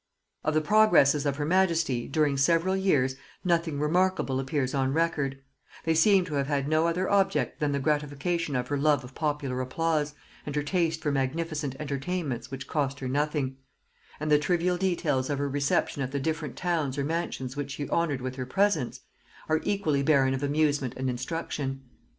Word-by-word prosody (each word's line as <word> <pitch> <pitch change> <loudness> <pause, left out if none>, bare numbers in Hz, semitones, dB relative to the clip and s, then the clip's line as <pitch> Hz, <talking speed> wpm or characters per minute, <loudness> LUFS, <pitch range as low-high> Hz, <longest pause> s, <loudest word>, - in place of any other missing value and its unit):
Of 155 0 0
the 155 - +4
progresses 150 -7 +4
of 140 - 0
her 145 - -1
majesty, 165 -8 +1
during 145 -1 +1
several 165 +7 +2
years, 140 -9 +2 0.3
nothing 170 -4 +1
remarkable 170 -3 +1
appears 135 0 -1
on 135 -1 +1
record; 150 -4 0 0.5
they 165 - +2
seem 185 +3 +4
to 160 - -7
have 140 -1 0
had 140 -2 0
no 155 +2 +3
other 180 +3 0
object 195 -1 +1
than 150 -1 +1
the 140 - 0
gratification 150 +3 -1
of 125 0 -2
her 145 -1 0
love 145 -2 +3
of 125 +1 -11
popular 145 -4 -2
applause, 150 +2 -1 0.3
and 145 - -5
her 150 - 0
taste 165 0 0
for 150 - +1
magnificent 145 +1 -2
entertainments 145 -2 -3
which 135 0 -7
cost 140 -2 -1
her 130 - -4
nothing; 145 -1 -1 0.6
and 155 0 -2
the 150 - +6
trivial 175 +3 +1
details 165 -8 0
of 145 - 0
her 140 +1 -1
reception 140 0 0
at 130 -1 -2
the 140 - -1
different 155 -1 -3
towns 160 -7 -1
or 140 - 0
mansions 145 -4 -3
which 145 -1 -4
she 145 +1 -4
honored 150 -6 0
with 130 +1 -5
her 130 - -3
presence, 190 -6 +1 0.5
are 160 0 +1
equally 175 -9 0
barren 135 -2 +3
of 135 - -2
amusement 145 -3 +1
and 130 0 -1
instruction. 135 0 -4
150 Hz, 180 wpm, -28 LUFS, 135-165 Hz, 0.6 s, the